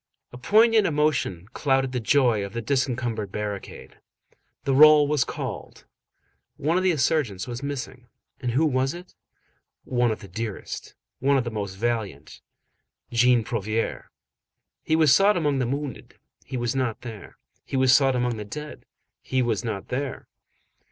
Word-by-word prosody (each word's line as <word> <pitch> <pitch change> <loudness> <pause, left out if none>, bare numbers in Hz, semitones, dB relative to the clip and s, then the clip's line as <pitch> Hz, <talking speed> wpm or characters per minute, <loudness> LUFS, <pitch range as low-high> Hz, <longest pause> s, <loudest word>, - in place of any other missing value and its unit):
A - - -8
poignant 220 - +4
emotion 150 - 0
clouded 135 -2 +1
the 125 - -2
joy 120 -3 +2
of 100 0 -7
the 115 - -3
disencumbered 120 -5 -1
barricade. 105 -1 -6 0.6
The 135 - 0
roll 150 +1 +7
was 150 -3 +2
called. - - -7 0.7
One 155 +4 0
of 185 - +2
the 185 - +2
insurgents 135 - 0
was 120 +1 -5
missing. 130 -3 -6 0.3
And 125 -2 -2
who 150 +6 +3
was 135 +1 0
it? 180 +1 -12 0.7
One 125 -1 +1
of 110 - -2
the 100 - -10
dearest. 110 +2 -6 0.2
One 140 +1 +3
of 130 - +1
the 120 - -4
most 100 -3 -4
valiant. 105 -9 -3 0.7
Jean 120 0 +4
Prouvaire. 110 0 -3 0.7
He 160 - 0
was 155 -4 +5
sought 200 0 +4
among 145 -5 +1
the 125 - 0
wounded, 140 +1 -5 0.3
he 130 - -5
was 120 +2 -1
not 125 -4 -1
there. 110 -5 -10 0.3
He 135 - -4
was 130 0 +5
sought 135 -2 +4
among 120 -2 0
the 105 - -5
dead, 150 +8 -9 0.3
he 130 -1 0
was 115 -2 -1
not 110 -5 -5
there. 130 +1 -4
125 Hz, 160 wpm, -25 LUFS, 115-145 Hz, 0.7 s, roll